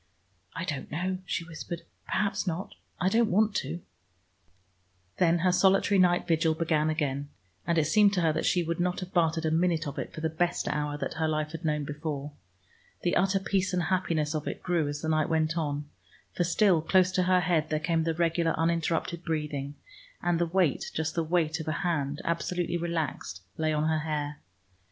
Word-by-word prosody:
"I 165 - -3
don't 145 -7 -4
know," 185 +4 -2
she 175 - -1
whispered. 165 +1 -7 0.2
"Perhaps 200 -1 0
not. 175 +2 -3 0.3
I 185 - +1
don't 225 +3 +3
want 210 +3 +3
to." 170 - -3 1.4
Then 175 -2 +4
her 185 - +5
solitary 195 +2 +4
night 180 0 +4
vigil 160 -1 +2
began 155 -1 +1
again, 145 -3 -1 0.4
and 170 -1 +2
it 155 - +3
seemed 205 +5 +5
to 180 - +1
her 160 -2 +3
that 160 - -1
she 175 - +2
would 170 +1 -2
not 180 +2 0
have 185 0 -7
bartered 165 -2 +2
a 160 - +1
minute 165 -1 +1
of 140 - -5
it - - -4
for 155 - -8
the 160 - +1
best 170 +2 -1
hour 150 0 -1
that - - -3
her 160 - +2
life 155 -1 -1
had 165 +1 -7
known 150 -2 0
before. 145 0 -4 0.7
The 175 - +1
utter 195 +1 +3
peace 190 -1 0
and 180 - +1
happiness 165 -4 0
of 155 -1 -3
it - - -5
grew 170 -4 +1
as 145 0 -4
the 160 - -2
night 155 +1 +2
went 160 0 +1
on, 145 -3 -2 0.5
for 175 - +1
still 180 -1 +3
close 185 +3 +3
to 185 - +1
her 185 -1 +5
head 160 -3 +1
there 155 - 0
came 165 0 +1
the 165 0 0
regular 170 0 +1
uninterrupted 165 +1 0
breathing, 150 -4 -3 0.4
and 175 -1 +1
the 170 - +2
weight, 170 -4 +1
just 160 0 -1
the 170 - 0
weight 160 -1 +1
of 160 - -6
a - - +1
hand 150 -5 -1
absolutely 170 +1 -1
relaxed, 160 - -3
lay 155 0 0
on 155 0 +1
her 160 0 +2
hair. 150 -1 -3
165 Hz, 200 wpm, -28 LUFS, 155-180 Hz, 1.4 s, her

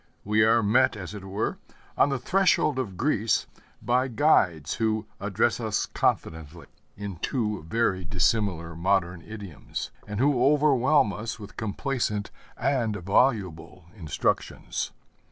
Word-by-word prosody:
We 105 +1 +3
are 115 +1 +4
met, 125 +5 +3
as 100 -1 -7
it 105 -2 -8
were, 95 +3 -3 0.4
on - - +4
the 135 - 0
threshold 155 -1 +2
of 100 -8 -4
Greece 115 -5 +1 0.4
by 125 +3 +2
guides 95 - +2
who 110 -1 0
address - - 0
us - - -1
confidently 80 +1 -2 0.3
in 100 -3 -6
two 105 - -2
very 95 -2 0
dissimilar 90 -1 0
modern 90 0 0
idioms, 95 -8 -7 0.2
and 105 0 -4
who 135 -1 +3
overwhelm 140 -5 +4
us 110 +5 -5
with 105 +1 -10
complacent 110 -1 -2 0.3
and 120 -4 0
voluble 95 -4 0
instructions. 80 -9 -2
105 Hz, 125 wpm, -26 LUFS, 95-125 Hz, 0.4 s, are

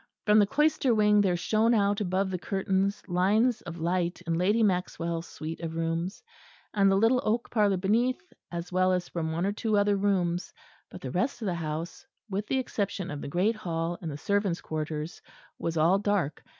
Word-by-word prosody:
From 210 0 +6
the 205 - +4
cloister 290 -1 +2
wing 210 -1 +5
there 185 -3 +2
shone 220 +6 +2
out 205 -1 +2
above 190 0 0
the 180 - -2
curtains 195 +1 -1
lines 210 +7 +2
of 170 0 -8
light 175 +1 -1
in 165 - -1
Lady 200 +7 +2
Maxwell's 170 -3 -1
suite 160 +1 -6
of 165 -1 -5
rooms, 165 +3 -2 0.5
and 195 -2 +4
the 195 - +4
little 225 +5 +3
oak 230 +3 -1
parlour 205 -4 +3
beneath, 240 - 0 0.2
as 170 +1 -5
well 185 +1 +3
as 180 -1 -1
from 160 -2 -3
one 170 +3 -1
or 200 - +1
two 215 0 0
other 205 0 +3
rooms; 185 -3 0 0.3
but - - -10
the 130 - -5
rest 240 - -1
of - - -2
the 185 - 0
house, 165 +6 -4 0.3
with 200 +2 -2
the 265 - +1
exception 200 -7 -2
of 145 -1 -5
the - - -5
great 190 +9 +1
hall 170 -3 -3
and 165 - -4
the 145 - -5
servants' 200 +1 0
quarters, 155 0 -4 0.4
was 165 0 -2
all 170 +5 +4
dark. 200 -8 -1
190 Hz, 195 wpm, -28 LUFS, 170-210 Hz, 0.5 s, From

